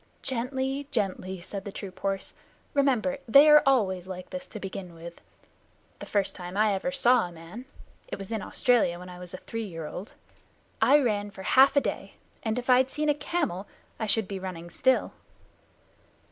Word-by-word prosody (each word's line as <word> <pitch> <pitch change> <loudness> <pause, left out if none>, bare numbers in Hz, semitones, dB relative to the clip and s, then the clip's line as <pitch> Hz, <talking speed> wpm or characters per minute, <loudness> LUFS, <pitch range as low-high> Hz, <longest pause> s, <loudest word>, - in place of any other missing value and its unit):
"Gently, 265 +2 -1
gently!" 190 -6 -2
said 195 +2 -7
the 200 - -6
troop 190 -2 -8
horse. 195 -1 -2 0.4
"Remember 275 -1 +1
they 280 +6 +8
are 300 0 +9
always 190 -9 +2
like 185 -1 -8
this 275 0 -6
to 215 - -8
begin 190 -3 -7
with. 170 +1 -10 0.8
The - - -8
first 200 -2 0
time 180 +1 -7
I 215 -1 +3
ever 195 +8 -2
saw 250 -6 +4
a - - -11
man 170 +9 -10 0.4
(it - - -5
was 195 +2 -7
in 220 -2 -2
Australia 240 -11 +2
when 180 +1 -10
I 180 0 -10
was 180 -1 -8
a - - -6
three 225 -1 -5
year 165 -5 -7
old) 180 +6 -8 0.7
I 290 - +6
ran 210 -6 0
for 190 -1 -10
half 270 +6 +5
a 285 - +5
day, - - -4 0.3
and 220 +1 -2
if 250 - -4
I'd 255 0 +5
seen 300 +2 -1
a - - +5
camel, 290 - -2 0.3
I 220 - -2
should 220 +2 +4
have 190 - -16
been 195 -2 -5
running 175 -2 -6
still." 260 +8 +2
210 Hz, 190 wpm, -27 LUFS, 185-260 Hz, 0.8 s, are